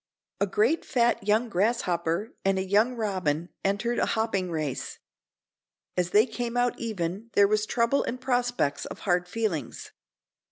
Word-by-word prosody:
A 200 - +2
great 225 - +2
fat 235 -4 +1
young 220 +4 +3
grasshopper 180 -2 0
and 195 0 +2
a 190 - -1
young 215 +6 +3
robin 185 -7 -1
entered 215 +5 0
a - - +2
hopping 200 -5 0
race. 155 -5 -3 1.0
As 180 -1 0
they 210 +4 +5
came 245 -2 -4
out 245 0 +1
even 205 -1 -3
there 200 0 +6
was 215 +1 +1
trouble 235 +4 +2
and 250 - -3
prospects 245 - 0
of - - -8
hard 180 -2 +1
feelings. 185 - -3
210 Hz, 150 wpm, -27 LUFS, 180-235 Hz, 1.0 s, there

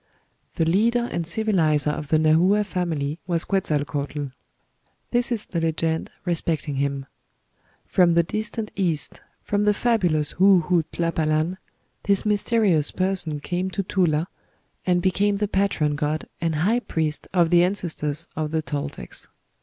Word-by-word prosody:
The 165 - +1
leader 230 +8 +2
and 170 -2 -2
civilizer 165 -7 +2
of 150 0 -5
the 155 - +3
Nahua 170 +7 +4
family 165 -5 -2
was 170 -2 +1
Quetzalcoatl. 145 -5 -1 0.8
This 245 +1 +1
is 225 -3 -2
the 170 - -3
legend 160 0 -1 0.2
respecting 160 -4 -1
him: 140 -1 -1 0.8
"From 175 -2 +3
the 170 - +5
distant 215 +4 -4
East, 170 -6 -1 0.2
from 205 0 0
the 210 0 +3
fabulous 180 - +1
Hue 190 -3 +6
Hue 175 -3 +2
Tlapalan, 165 +1 0 0.4
this 200 0 +3
mysterious 205 -6 +2
person 185 -5 -1
came 180 +4 -2
to 195 +1 -2
Tula, 170 -4 +1 0.6
and 175 -1 +2
became 200 +2 +2
the 210 +1 -1
patron 190 -7 +1
god 150 +1 -2
and 165 -2 0
high 200 +11 +2
priest 160 -9 -3
of 175 -3 +2
the 175 0 +6
ancestors 170 -5 -1
of 155 -1 -2
the 160 0 -1
Toltecs. 145 - -4
170 Hz, 140 wpm, -24 LUFS, 155-195 Hz, 0.8 s, Hue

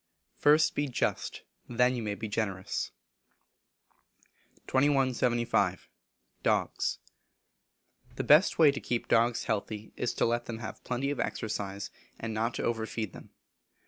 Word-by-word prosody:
[FIRST 150 +2 +5
BE 145 - 0
JUST, 125 - -2 0.3
THEN 125 +1 +3
YOU 120 - -3
MAY 105 -2 -2
BE 110 +1 -5
GENEROUS.] 100 -3 -2 1.8
2175. 130 -4 +2 0.5
Dogs. - - +1 1.2
The - - -2
best 155 +7 +6
way 155 -3 +7
to 140 - -4
keep 120 -1 -2
dogs 115 +1 +3
healthy 110 -1 -3
is 125 - -2
to - - +2
let 120 +1 0
them 115 - -5
have 110 -1 -7
plenty 130 +3 -1
of 145 - -4
exercise, 100 -2 -3 0.3
and 115 -1 -4
not 115 +2 -1
to - - -3
over 115 -1 -1
feed 110 -5 -4
them. - - -12
120 Hz, 135 wpm, -30 LUFS, 110-130 Hz, 1.8 s, way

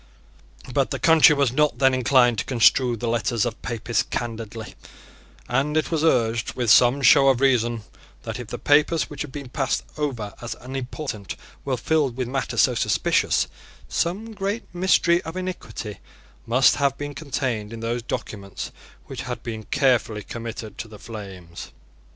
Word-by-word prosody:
But - - +2
the - - -2
country 160 -2 +6
was 140 -4 +2
not 150 +3 +2
then 135 -1 +4
inclined 125 -3 +3
to - - -2
construe 125 0 +4
the 120 - -3
letters 115 0 0
of 120 -1 -5
Papists 115 0 -1
candidly; 115 -1 -5 0.7
and 140 +5 0
it 155 - 0
was 160 -2 0
urged, 115 -6 +1
with 120 -3 +2
some 125 +4 +5
show 135 +3 +7
of 130 -3 +4
reason, 120 -4 +2 0.4
that, - - -5
if 120 - -7 0.2
papers 150 +3 +3
which 150 - -6
had 150 - -5
been 140 -3 -7
passed 135 0 -1 0.2
over 120 -9 -3
as 120 - -5
unimportant 130 -4 -5 0.3
were 135 -2 -1
filled 140 -1 0
with 130 -2 -2
matter 135 +1 -3
so - - +4
suspicious, - - +1 0.4
some 205 +7 -2
great 205 +2 -2
mystery 175 -1 +3
of 165 +3 -7
iniquity 180 - -6 0.5
must 130 +3 +4
have 140 -1 +1
been 145 0 -5
contained 130 -8 -3
in 115 -1 -7
those 120 +1 -2
documents 100 -4 -6 0.3
which - - -6
had - - -6
been 110 -2 -6
carefully 125 -6 +1
committed 115 -2 -7
to 115 - -5
the 105 -1 -12
flames. 95 -7 -9
125 Hz, 160 wpm, -23 LUFS, 115-145 Hz, 0.7 s, show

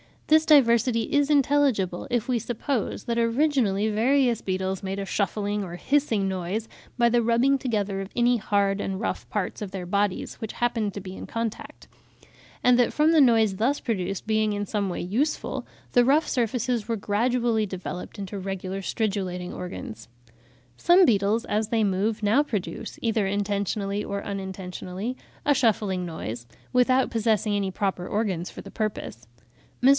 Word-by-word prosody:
This 315 +1 +4
diversity 235 -5 +5
is 290 0 +3
intelligible, 275 -11 +2
if 240 0 -1
we 245 -2 +2
suppose 235 -1 -2
that 235 0 -1
originally 230 -4 +2
various 240 +2 +2
beetles 190 0 -2
made 195 0 -4
a 200 - -3
shuffling 205 +1 -1
or 175 -3 -5
hissing 225 -3 +1
noise 190 +4 -3 0.3
by 235 -1 +4
the 240 0 +3
rubbing 235 +4 +3
together 210 -7 -1
of 195 - -6
any 240 0 +3
hard 200 -2 +1
and 190 -1 -3
rough 220 - -3
parts 210 0 -3
of 205 - -4
their 190 -2 -5
bodies, 200 +1 -1
which 220 - -6
happened 230 -4 -1
to 200 - -6
be 185 0 -8
in - - -8
contact; 230 -1 -5 0.8
and 250 0 +5
that 245 - +3
from 305 +2 +4
the 325 - +5
noise 225 -6 +4
thus 260 +7 +1
produced 195 -4 -2
being 215 -1 +1
in 205 0 -2
some 200 -1 -1
way 180 - -3
useful, 240 - -2 0.2
the 245 -1 +5
rough 295 +5 +3
surfaces 235 -2 -1
were 230 - 0
gradually 225 +2 +1
developed 180 -2 -6
into 200 0 -5
regular 190 0 -4
stridulating 185 -3 -2
organs. 115 -11 -7 0.7
Some 355 - +5
beetles 210 -2 +2
as 215 +1 0
they 225 -2 +2
move, 210 +3 0
now 215 +7 +4
produce, 220 -4 -4
either 220 -3 +1
intentionally 200 0 -1
or 200 0 -4
unintentionally, 190 +3 -5 0.3
a 290 - +5
shuffling 210 -7 +1
noise, 120 -8 -6 0.3
without 255 +1 +3
possessing 220 -2 +1
any 200 -1 0
proper 190 -1 -2
organs 195 -5 -1
for - - -9
the - - -11
purpose. 205 - -4 0.6
Mr. 260 - +7
215 Hz, 160 wpm, -25 LUFS, 195-240 Hz, 0.8 s, Mr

